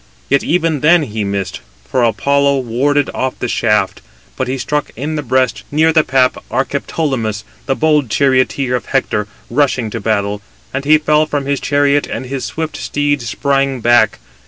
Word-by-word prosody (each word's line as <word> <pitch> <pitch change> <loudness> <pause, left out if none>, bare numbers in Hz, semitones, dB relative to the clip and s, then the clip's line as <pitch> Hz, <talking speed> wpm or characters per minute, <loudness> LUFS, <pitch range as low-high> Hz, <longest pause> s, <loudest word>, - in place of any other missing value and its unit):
Yet 140 - +3
even 165 -3 +1
then 160 +3 +4
he 110 -5 -3
missed, 100 -1 -3 0.3
for 130 - +1
Apollo 140 +4 +2
warded 135 +4 0
off 130 0 -2
the 125 - -3
shaft: 105 -2 0 0.3
but 130 - -2
he 130 +1 -2
struck 145 +3 -2
in 150 +6 -3
the 150 - -1
breast, 130 -2 0
near 160 +2 +3
the 155 -1 +4
pap, 130 -2 +1
Archeptolemus, 130 -5 -2 0.2
the 135 - +1
bold 150 -5 +2
charioteer 130 0 +1
of 125 - -4
Hector, 105 -6 0 0.2
rushing 125 -4 +1
to 115 - -4
battle: 100 -1 -1 0.3
and 135 +1 -3
he 155 +1 +6
fell 150 0 +2
from 145 -2 -2
his 140 0 0
chariot, 145 0 +2
and 130 - -5
his 130 0 -4
swift 160 -1 -4
steeds 145 -5 -1
sprang 135 0 0
back. 120 -2 +3
135 Hz, 170 wpm, -16 LUFS, 120-145 Hz, 0.3 s, he